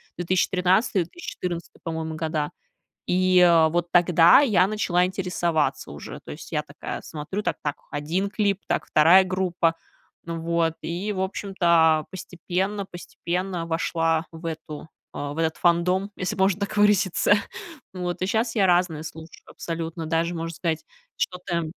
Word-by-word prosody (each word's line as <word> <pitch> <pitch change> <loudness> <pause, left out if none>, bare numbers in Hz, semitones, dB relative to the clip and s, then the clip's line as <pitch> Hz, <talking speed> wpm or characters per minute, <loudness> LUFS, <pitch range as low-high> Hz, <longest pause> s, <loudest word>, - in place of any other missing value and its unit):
2013-2014, 180 - -1
по-моему, 160 -1 -4
года. 155 -2 -2 0.6
И, 185 0 +3
э, 170 -3 +6
вот 175 +1 -1
тогда 175 - +6
я 200 -10 +4
начала 180 -4 +1
интересоваться 175 -4 -1
уже. - - -9
То - - -7
есть - - -10
я - - +1
такая - - -7
смотрю: 160 +7 -5
"Так - - -1
так, 145 -1 -2
1 165 +7 -2
клип, 200 -2 0
так, - - -1
2 170 +5 +6
группа". 180 -3 0 0.5
Ну 165 0 -4
вот, 165 -1 +1
и, 180 +6 -3
в 185 - -3
общем-то, 170 -5 +2
постепенно 190 +2 -3
постепенно 175 0 -4
вошла 165 0 0
в 165 +1 -12
эту, 160 -1 -6 0.3
а, 145 0 -4
в 155 - -8
этот 160 -1 0
фандом, 180 +3 +2
если 185 0 -3
можно 190 +1 +2
так 200 +1 -3
выразиться. 205 -2 +3 0.6
Вот 180 -1 -4
и 185 - 0
щас 225 +3 0
я 200 -3 +3
разные 175 -3 +2
слушаю 160 0 -10
абсолютно. 165 0 -5
Даже 165 +1 0
можно 165 0 -4
сказать, 165 -2 -2 0.3
что-то 180 -2 -2
175 Hz, 145 wpm, -24 LUFS, 165-190 Hz, 0.6 s, э